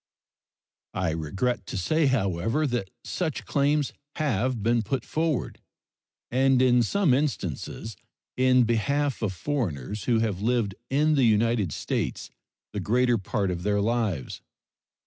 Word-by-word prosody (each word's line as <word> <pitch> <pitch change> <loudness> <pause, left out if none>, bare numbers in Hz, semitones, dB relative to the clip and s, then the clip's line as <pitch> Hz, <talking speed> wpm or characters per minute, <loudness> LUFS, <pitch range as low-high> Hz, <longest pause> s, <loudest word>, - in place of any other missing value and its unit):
I 95 -3 0
regret 95 +8 -2
to - - -4
say, 155 - +2
however, 115 - +1
that 120 -8 -2
such 160 -6 -3
claims 145 0 +1 0.2
have 130 - 0
been 115 +1 +3
put 125 +5 -3
forward, 160 -4 -1 0.7
and 130 +1 +3
in 125 -1 +5
some 170 - +2
instances 115 - -2 0.4
in 130 -1 +4
behalf 135 +5 0
of 105 -4 0
foreigners 95 - -3
who 120 -2 +3
have 110 -4 -1
lived 115 -3 +1 0.2
in 150 +3 +3
the 135 -4 +4
United 110 -4 +2
States - - -3 0.4
the - - -2
greater 120 +1 +2
part 95 0 -1
of 85 -1 -3
their 100 +2 +1
lives. 105 - -1
120 Hz, 130 wpm, -26 LUFS, 100-135 Hz, 0.7 s, in